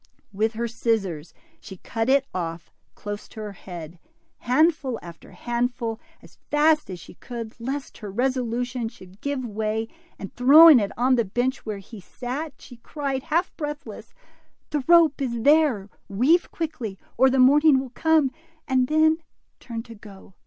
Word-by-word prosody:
With 220 +3 0
her 235 +2 -2
scissors 210 -9 -2 0.3
she 190 - -11
cut 225 +6 -3
it 270 0 +4
olf 170 -2 -5 0.2
close 205 0 -7
to - - -12
her 210 -1 -6
head, 175 -4 -10 0.4
handful 275 -1 +1
after 170 -1 -12
handful, 240 -1 -2 0.2
as - - -18
fast 305 -1 +3
as 180 -2 -6
she - - -13
could, 230 +3 -8
lest 270 +4 -5
her 210 -3 -7
resolution 245 +1 -1
should 195 -3 -16
give 280 -2 -3
way, 220 0 -2 0.3
and 195 - -8
throwing 290 +3 +8
it 200 -2 -2
on 255 +2 +3
the 235 - +3
bench 245 +5 -2
where 210 -2 -3
he 200 +3 -11
sat, 265 - -6
she 245 - -13
cried, 275 +2 -4
half 335 +6 -1
breathless, 295 -2 -7 0.6
The 295 -3 -1
rope 335 -4 +5
is 235 -4 -2
there; 285 -9 +3 0.2
weave 260 - +2
quickly, 280 - -5 0.2
or 265 +2 +5
the 265 - 0
morning 280 +2 +6
will 260 -2 -6
come," 315 -1 +2 0.4
and 255 -2 +2
then 315 +2 +3 0.4
turned 230 -1 -7
to 230 - -11
go. 200 -3 -14
245 Hz, 160 wpm, -24 LUFS, 215-285 Hz, 0.6 s, throwing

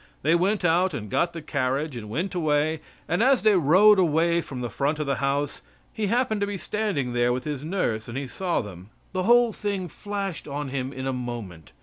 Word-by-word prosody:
They 155 +4 +3
went 190 +3 +1
out 175 0 +3
and 105 -6 -6
got 170 - +1
the 165 -2 -7
carriage, 140 0 -1
and 110 -3 -7
went 170 - -2
away, 155 -2 +1 0.3
and 175 +5 0
as 260 +1 +4
they 215 -2 +5
rode 190 +6 +6
away 170 0 +3
from 130 -5 -7
the 120 - -3
front 145 +7 0
of 150 - -2
the 140 -2 0
house, 140 +2 -1 0.3
he 215 -2 -1
happened 225 -1 +1
to 200 - +1
be 205 -1 -3
standing 185 - -2
there 120 0 +2
with 125 +1 -2
his 145 -1 -4
nurse, 150 - -1
and 120 +2 -5
he 140 - -3
saw 175 +6 -1
them. 95 -2 -10 0.2
The 185 - -1
whole 240 -1 +5
thing 200 -3 -3
flashed 200 -4 -5
on 145 0 -4
him 130 0 -3
in 130 -1 -6
a 135 - -1
moment. 120 -10 -6
155 Hz, 220 wpm, -25 LUFS, 130-190 Hz, 0.3 s, rode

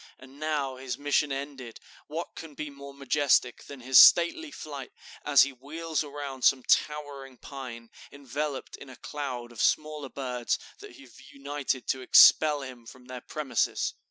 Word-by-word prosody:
And 135 +2 -16
now, 145 -4 -2
his 130 -2 -5
mission 145 0 0
ended, 135 -4 -6 0.3
what 160 +3 -6
can 160 -3 -10
be 150 0 -6
more 140 0 -11
majestic 140 -2 +1
than 140 -2 -11
his 130 0 +6
stately 175 - +6
flight, 140 - -8 0.3
as 140 -4 +6
he 140 0 -3
wheels 155 +5 -4
around 140 -2 -7
some 130 0 +3
towering 140 -3 -1
pine, 120 -5 -9 0.2
enveloped 140 +1 -5
in 140 - -12
a 130 - -11
cloud 125 -5 -6
of 120 - -6
smaller 150 -2 0
birds 125 -3 -3 0.2
that - - -12
have 130 -4 -16
united 140 -2 -4
to 130 - -1
expel 150 +3 +6
him 125 -3 -11
from 125 +1 -14
their 125 -1 -8
premises." 150 0 -2
140 Hz, 155 wpm, -27 LUFS, 130-145 Hz, 0.3 s, his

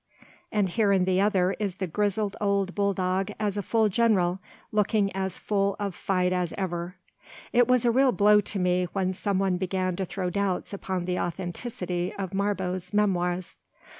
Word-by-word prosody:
And 205 -3 +1
here 205 +2 +2
in 190 -2 +3
the 185 0 +2
other 190 -3 +2
is 200 -4 -2
the 190 - -3
grizzled 205 +3 -1
old 200 -2 +1
bull 200 -1 +1
dog 185 0 0
as 210 -2 -1
a 205 - -1
full 220 +2 +2
general, 195 -4 +2 0.3
looking 210 -2 +1
as 190 -1 -2
full 200 -1 0
of 200 -2 -2
fight 185 -1 0
as 180 -2 -1
ever. 175 -1 -3 0.6
It 245 0 +5
was 250 -1 +3
a 235 - +5
real 260 +2 +4
blow 210 -1 +5
to 205 - -5
me 180 -1 +2
when 190 -1 0
some 195 +1 -1
one 190 -2 +1
began 185 0 -1
to 190 - -1
throw 180 0 -3
doubts 200 0 -1
upon 190 -2 -3
the 180 0 -1
authenticity 180 0 -3
of 195 -1 -4
Marbot's 190 -2 -2
memoirs. 180 -3 0
190 Hz, 180 wpm, -27 LUFS, 180-205 Hz, 0.6 s, It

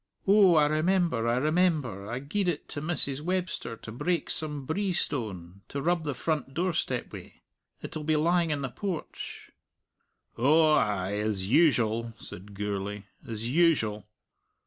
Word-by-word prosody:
"Oh, 195 -3 +6
I 150 -1 +5
remember, 155 -4 +1
I 120 +1 +2
remember! 150 - +1
I 120 - -3
gied 180 +9 -2
it 165 -4 -2
to 145 - -4
Mrs. 150 -4 +2
Webster 180 -9 -2
to 105 - -9
break 170 +9 -1
some 150 -4 -2
brie 190 +6 -1
stone, 100 - -2
to 140 - -4
rub 170 +2 0
the 145 -3 -2
front 145 -1 -2
doorstep 180 0 -1
wi'. - - -9 0.5
It'll 155 - -5
be 155 +1 +1
lying 170 +2 +2
in 145 -2 -1
the 135 - -2
porch." 180 +3 -6 0.9
"Oh, 155 +5 +5
ay, 100 -8 +1
as 105 -3 -1
usual," 115 -7 +3
said 100 0 -9
Gourlay 100 0 -3 0.2
"as 115 +1 -4
usual." 135 - +2
145 Hz, 145 wpm, -28 LUFS, 115-170 Hz, 0.9 s, Oh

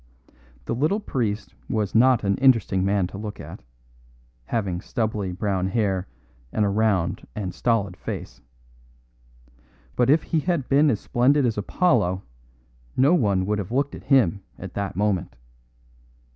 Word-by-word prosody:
The - - -2
little 155 - +1
priest 115 - -3 0.2
was 105 -3 -1
not 120 0 +4
an 100 -1 +2
interesting 115 -8 +3
man 100 -1 +2
to 95 +2 -7
look 105 -1 -6
at, - - -9 0.8
having 95 - -2
stubbly 105 -4 -2
brown 95 -1 -1
hair 95 -3 0 0.4
and 105 - +1
a - - +1
round 100 -3 0
and 95 -4 -4
stolid 100 -6 0
face. - - -7 1.5
But 125 0 +2
if 155 +2 +4
he 165 - 0
had 165 -4 -1
been 145 +2 +4
as 110 -6 +1
splendid 135 +3 +2
as 115 -2 0
Apollo 100 - +1 0.7
no 140 +6 +5
one 100 - +2
would 105 +1 0
have 100 +1 -5
looked 140 +3 0
at - - -10
him 110 - +3 0.2
at 95 -1 -8
that 100 -3 -3
moment. 95 -8 -1
105 Hz, 145 wpm, -24 LUFS, 95-130 Hz, 1.5 s, no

